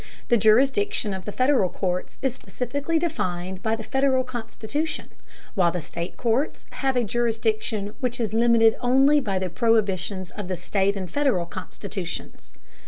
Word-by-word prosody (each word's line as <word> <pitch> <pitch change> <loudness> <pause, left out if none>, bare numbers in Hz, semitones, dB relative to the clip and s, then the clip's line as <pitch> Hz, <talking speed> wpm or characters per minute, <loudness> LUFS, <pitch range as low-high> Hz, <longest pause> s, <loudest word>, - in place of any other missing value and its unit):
The 240 - +5
jurisdiction 250 - +3
of 190 -1 -6
the 210 - -4
Federal 255 -5 +3
courts 180 0 -3
is 265 -3 +1
specifically 280 +6 -2
defined 185 - -2
by 220 +2 +1
the 225 - -7
Federal 265 +1 +2
Constitution, 255 +5 -4 0.4
while 180 -5 +3
the 180 - -2
state 170 +2 -6
courts 245 +5 0
have 270 -1 -1
a 245 - +2
jurisdiction 220 -2 -1
which 250 -2 -2
is 220 -3 -1
limited 225 -1 +5
only 270 +4 +5
by 200 -8 -1
the 185 -2 -2
prohibitions 195 -4 +1
of 205 -3 -6
the 185 -1 -2
state 195 +3 +1
and 190 -2 -4
Federal 270 -12 +1
Constitutions. 185 +1 -6
225 Hz, 155 wpm, -25 LUFS, 190-260 Hz, 0.4 s, The